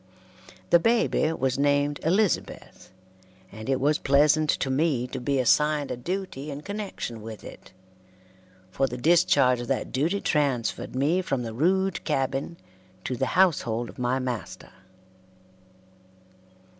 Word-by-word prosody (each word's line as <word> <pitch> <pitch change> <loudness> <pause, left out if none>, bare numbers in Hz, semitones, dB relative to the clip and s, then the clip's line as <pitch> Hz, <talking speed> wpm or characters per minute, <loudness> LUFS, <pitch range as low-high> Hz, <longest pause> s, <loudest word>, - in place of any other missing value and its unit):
The 170 - +7
baby 225 -6 +2
was 130 -3 -1
named 145 0 +1
Elizabeth, 190 - -1 0.6
and 110 +4 -8
it 135 -1 +1
was 145 +3 +2
pleasant 150 +2 +3
to 135 - 0
me 135 -3 +1
to 125 - -6
be 140 +2 -1
assigned 150 +3 +2
a - - -2
duty 155 +1 -5
in 145 0 -6
connection 200 - -6
with 110 0 -9
it, - - -12 1.0
for 135 +8 0
the 125 - -6
discharge 130 -3 +3
of 120 - -6
that 135 - -2
duty 165 +10 0
transferred 140 - -1
me 150 +8 +1
from 135 -8 -2
the 115 -1 -5
rude 190 +8 +1
cabin 135 +2 -2 0.5
to 130 - -3
the - - -1
household 120 -11 +2
of - - -13
my 125 +1 0
master. 125 -5 -5
140 Hz, 135 wpm, -26 LUFS, 125-160 Hz, 1.0 s, The